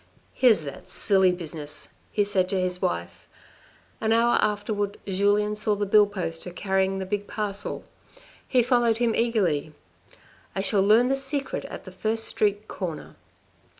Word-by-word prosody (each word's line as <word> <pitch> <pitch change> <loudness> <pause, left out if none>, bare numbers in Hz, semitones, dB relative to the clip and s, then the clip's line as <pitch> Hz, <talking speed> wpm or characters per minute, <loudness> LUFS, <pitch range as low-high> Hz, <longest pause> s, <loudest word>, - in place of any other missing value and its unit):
" - - -37
Here's 225 -10 +4
that 140 -2 -9
silly 190 -2 +3
business," 155 -4 -4 0.2
he 205 - +2
said 190 -2 0
to 190 - 0
his 180 0 -2
wife. 85 0 -3 0.7
An 220 - +1
hour 235 +1 +4
afterwards 205 -1 -1
Julien 205 +2 +1
saw 210 0 +2
the 205 0 -1
bill 205 +1 +5
poster 175 -4 -5
carrying 190 +1 0
the 190 - -3
big 205 +1 -3
parcel. 205 -2 -3 0.6
He 250 -2 +3
followed 240 -2 +2
him 235 -1 +1
eagerly. 180 -11 0 0.4
" - - -29
I 195 - 0
shall 195 0 +2
learn 220 +5 +4
the 270 - +2
secret 270 0 -2
at - - -9
the - - -9
first 225 +1 -1
street 210 0 +1
corner." 170 -5 -6
205 Hz, 160 wpm, -25 LUFS, 185-220 Hz, 0.7 s, bill